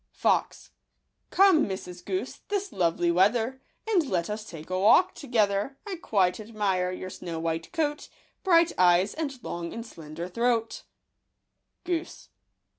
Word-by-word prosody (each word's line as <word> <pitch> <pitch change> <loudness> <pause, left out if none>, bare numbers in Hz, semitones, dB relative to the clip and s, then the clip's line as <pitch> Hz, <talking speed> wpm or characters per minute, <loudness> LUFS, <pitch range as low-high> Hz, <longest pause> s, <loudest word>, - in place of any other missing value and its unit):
Fox. - - 0 0.2
— - - -50
" - - -51
Come, 375 -6 +5
Mrs. 180 -2 -6
Goose, 375 0 -3
this 405 -1 -2
lovely 170 -1 +1
weather, 225 +8 +2 0.3
And 360 -10 +2
let 175 +1 -1
us 210 +1 -4
take 160 +1 -10
a 185 - 0
walk 220 - +5
together; 220 -1 0
I 395 -4 -5
quite 195 - +1
admire 205 -4 -1
your 185 0 -6
snow 170 -3 -6
white 165 0 -3
coat, 300 -3 -2 0.3
Bright 340 -3 +5
eyes, 180 +2 +4
and 290 -4 -4
long 170 -1 -5
and 230 0 -6
slender 165 -4 -8
throat/' 230 +3 0 1.0
Goose 350 -1 -4
210 Hz, 145 wpm, -27 LUFS, 180-295 Hz, 1.0 s, Come